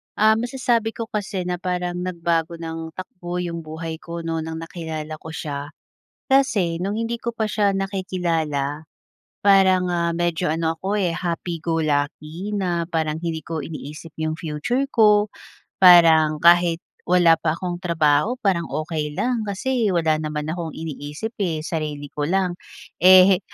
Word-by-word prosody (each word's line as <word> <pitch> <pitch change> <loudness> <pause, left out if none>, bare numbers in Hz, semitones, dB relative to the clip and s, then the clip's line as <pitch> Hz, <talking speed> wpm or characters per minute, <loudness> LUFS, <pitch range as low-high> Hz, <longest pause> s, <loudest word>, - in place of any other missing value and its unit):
Ah, 215 +1 +5
masasabi 240 -2 0
ko 230 - -4
kasi 200 -2 -3
na 180 0 -1
parang 180 -1 -2
nagbago 170 -2 -1
ng 165 -1 -6
takbo 180 -1 -6
'yong 170 -1 -4
buhay 160 +1 -5
ko 170 0 -6
noon 165 -1 -2
ng 160 0 -5
nakilala 160 -2 -6
ko 160 - -9
siya 145 -2 -5 0.6
kasi 205 -11 +2
no'ng 200 +2 -2
hindi 235 +1 -2
ko 235 0 -4
pa 220 - 0
siya 205 -2 +2
nakikilala 165 -7 -2 0.6
parang, 190 -2 +5
ah, 170 -1 0
medyo 175 0 0
ano 165 0 0
ako, 200 +2 -1
eh, 180 -4 +1
happy 170 -1 -3
go 165 -1 0
lucky 155 +5 -2
na 175 -4 0
parang 160 -2 -1
hindi 165 -2 -2
ko 160 -2 -3
iniisip 155 +1 -8
yung 155 0 -1
future 165 - -1
ko. 210 -2 +5 0.5
Parang 165 -4 +7
kahit 170 -1 +5 0.3
wala 175 -2 +5
pa 155 -2 0
akong 175 0 -4
trabaho 160 +5 +2
parang 185 -4 +1
okey 155 -1 -3
lang, 245 -2 0
kasi 230 +2 0
wala 160 -2 +2
naman 150 -1 -3
akong 165 -1 -4
iniisip 155 +5 -6
eh, 165 -5 -1
sarili 150 -3 -3
ko 145 - -2
lang. 185 0 +1 0.5
Eh, 185 0 +8
170 Hz, 155 wpm, -22 LUFS, 160-190 Hz, 0.6 s, Eh